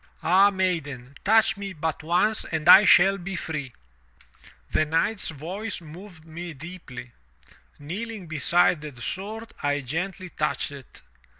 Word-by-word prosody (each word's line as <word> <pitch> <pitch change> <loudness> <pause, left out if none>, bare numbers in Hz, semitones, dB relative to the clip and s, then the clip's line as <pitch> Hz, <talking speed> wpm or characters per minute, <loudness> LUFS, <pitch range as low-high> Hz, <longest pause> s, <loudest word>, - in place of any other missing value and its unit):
Ah, 190 +4 +5
maiden, 160 -10 -2
touch 220 0 +4
me 200 -1 -6
but 160 -1 -3
once 180 +7 +1
and 160 -1 -3
I 205 - +10
shall 195 +1 +6
be 190 +2 -5
free!' 155 -6 -5 1.0
'The 155 - +2
knight's 165 +7 0
voice 180 +8 -5
moved 170 +1 -13
me 170 +1 -7
deeply. 135 -6 -10 0.7
Kneeling 200 +6 -6
beside 160 +1 +2
the 145 -5 -9
sword, 215 - -5
I 145 0 0
gently 180 +7 -4
touched 150 -2 -2
it. 140 -4 -13
170 Hz, 130 wpm, -25 LUFS, 150-195 Hz, 1.0 s, I